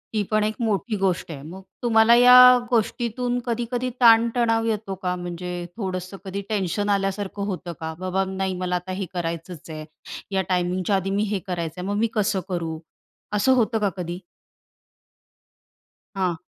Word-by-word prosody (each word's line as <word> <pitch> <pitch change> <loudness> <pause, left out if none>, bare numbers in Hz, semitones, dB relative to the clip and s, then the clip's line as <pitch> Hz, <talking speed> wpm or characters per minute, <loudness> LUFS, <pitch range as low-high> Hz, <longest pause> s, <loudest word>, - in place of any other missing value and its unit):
ही 210 - +2
पण 215 0 +3
एक 215 +1 0
मोठी 220 0 -1
गोष्ट 185 -3 -1
आहे. 140 -3 -7
मग 175 +6 -9 0.2
तुम्हाला 230 0 +5
या 250 +1 +9
गोष्टीतून 245 +1 0
कधी-कधी 240 +1 -2
ताणतणाव 230 0 +4
येतो 210 -3 -2
का? 180 0 0
म्हणजे 175 0 -5
थोडंसं 185 -1 -4
कधी 195 +1 -4
टेन्शन 205 0 -1
आल्यासारखं 200 0 -1
होतं 180 -3 -4
का, 160 0 -4
"बाबा 185 +1 0
नाही 190 0 -2
मला 180 0 -1
आता 180 +1 -4
हे 195 +1 -3
करायचंच 170 -1 -5
आहे, 155 -1 -7 0.5
या 190 - +3
टायमिंगच्या 180 +2 0
आधी 190 0 -1
मी 200 +2 +1
हे 200 - 0
करायचं 175 -1 -4
आहे, 185 - -5
मग 205 - -1
मी 230 - +2
कसं 210 -2 +1
करू?" 165 -3 -3 0.6
असं 260 +6 +4
होतं 230 -2 +1
का 205 -2 +1
कधी? 175 0 -4 2.0
हां. 185 -3 0
195 Hz, 160 wpm, -23 LUFS, 180-225 Hz, 2.0 s, या